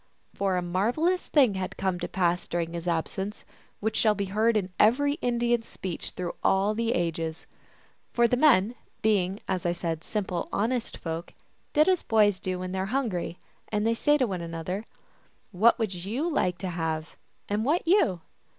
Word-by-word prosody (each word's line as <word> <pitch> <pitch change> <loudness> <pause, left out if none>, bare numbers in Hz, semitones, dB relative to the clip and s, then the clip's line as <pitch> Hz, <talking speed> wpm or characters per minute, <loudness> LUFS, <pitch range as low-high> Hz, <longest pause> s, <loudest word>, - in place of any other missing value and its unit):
For 195 -2 0
a 180 - -1
marvelous 240 - +1
thing 265 -9 +4
had 190 -1 -4
come 190 -2 -1
to - - -3
pass 175 -1 0
during 170 -1 -2
his 170 +1 -5
absence, 190 +5 -2 0.4
which 220 +1 -1
shall 215 -2 +3
be 200 0 -1
heard 220 +1 +3
in 190 -3 -2
every 285 +7 +4
Indian 240 -1 +1
s 225 - -16
speech 185 -3 -5
through 180 -1 -4
all 195 +2 +3
the 230 +1 0
ages. 165 -2 -2 0.7
For 235 0 +4
the 250 - +2
men, 245 -6 +4 0.3
being, 200 -2 +1
as 185 -2 -1
I 175 -1 +1
said, 165 -2 -3
simple, 185 -4 -3
honest 235 +3 -1
folk, 165 0 -5 0.4
did 305 +3 +5
as 370 -2 +3
boys 210 -4 +3
do 185 -1 -3
when 185 0 -5
they 190 - -2
are 190 - 0
hungry, 215 -9 -2 0.3
and 210 0 0
say 295 +5 +3
unto 285 -3 +3
one 190 -6 -3
another, 170 +5 -4 0.4
" - - -37
What 235 +1 +6
would 220 -5 -1
you 210 - -2
like 180 - 0
to 185 +1 -4
have, 160 -2 -3 0.3
and 205 +2 0
what 310 +7 +1
you 265 - +3
195 Hz, 185 wpm, -27 LUFS, 175-235 Hz, 0.7 s, What